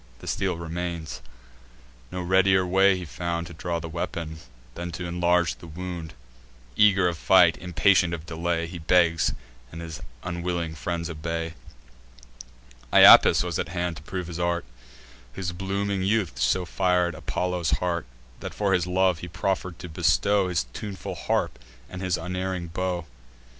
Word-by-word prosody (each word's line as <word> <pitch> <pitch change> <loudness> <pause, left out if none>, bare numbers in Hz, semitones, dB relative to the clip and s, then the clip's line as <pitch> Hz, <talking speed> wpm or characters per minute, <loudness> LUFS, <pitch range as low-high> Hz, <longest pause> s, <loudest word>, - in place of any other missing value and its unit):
The - - -13
steel 95 -3 -1
remains. 85 -1 -5 0.9
No 90 - -4
readier 95 +1 +4
way 95 +1 +4
he 90 - -6
found 85 +1 -3
To 85 - -10
draw 85 +1 -3
the 85 - -6
weapon, 80 -1 -4 0.3
than 85 +4 -5
t' 90 +1 -5
inlarge 85 -1 +2
the 85 - -12
wound. 85 -2 -6 0.6
Eager 100 -1 +5
of 85 -2 -2
fight, - - +6
impatient 90 0 +3
of 85 -2 -5
delay, 85 0 -1
He 85 +1 -7
begs; 85 0 +3 0.4
and 85 - -8
his 80 -2 -7 0.2
unwilling 85 -2 -3
friends 85 +2 -3
obey. 80 +1 -4 1.4
Iapis - - +8
was 85 -2 -2
at - - -2
hand 85 0 -2
to - - -10
prove 90 +3 -5
his 85 0 -6
art, 85 0 0 0.7
Whose 90 +5 -3
blooming 95 +2 -2
youth 100 -1 0
so 90 -1 +2
fir'd 90 0 +1
Apollo's 90 +2 -2
heart, 85 -5 -2 0.3
That, - - -7
for 100 -2 +1
his 90 -1 +1
love, 90 -2 +2
he 90 - -7
proffer'd 90 0 -2
to 90 - -8
bestow 100 +4 +2
His 90 -7 0
tuneful 100 -3 -6
harp - - -1 0.3
and 90 +5 -8
his 90 -2 0
unerring 90 0 -3
bow. 90 0 -2
90 Hz, 155 wpm, -26 LUFS, 85-90 Hz, 1.4 s, Iapis